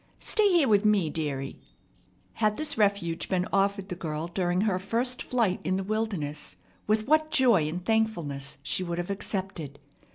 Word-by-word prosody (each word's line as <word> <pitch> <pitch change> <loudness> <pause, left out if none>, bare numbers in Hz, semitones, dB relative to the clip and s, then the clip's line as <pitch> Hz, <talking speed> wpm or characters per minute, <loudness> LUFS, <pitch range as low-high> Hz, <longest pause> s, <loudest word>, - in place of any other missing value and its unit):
Stay 430 -2 +3
here 335 -6 +4
with 205 -2 +4
me, 205 -7 +3
dearie." 140 -4 -3 0.7
Had 215 -1 +1
this 310 - -1
refuge 200 -6 0
been 185 -1 +1
offered 195 0 +1
the 180 - -3
girl 160 -2 -4
during 175 +1 0
her 200 -4 +1
first 235 +6 -1
flight 230 -7 0
in 185 - 0
the 195 - -2
wilderness, 195 -8 -3 0.3
with 215 +1 +1
what 310 +1 +3
joy 235 - +4
and 175 +4 -5
thankfulness 170 -12 -1
she 185 - 0
would 170 -1 -3
have 175 +2 -3
accepted! 190 -7 -4
195 Hz, 165 wpm, -28 LUFS, 170-220 Hz, 0.7 s, here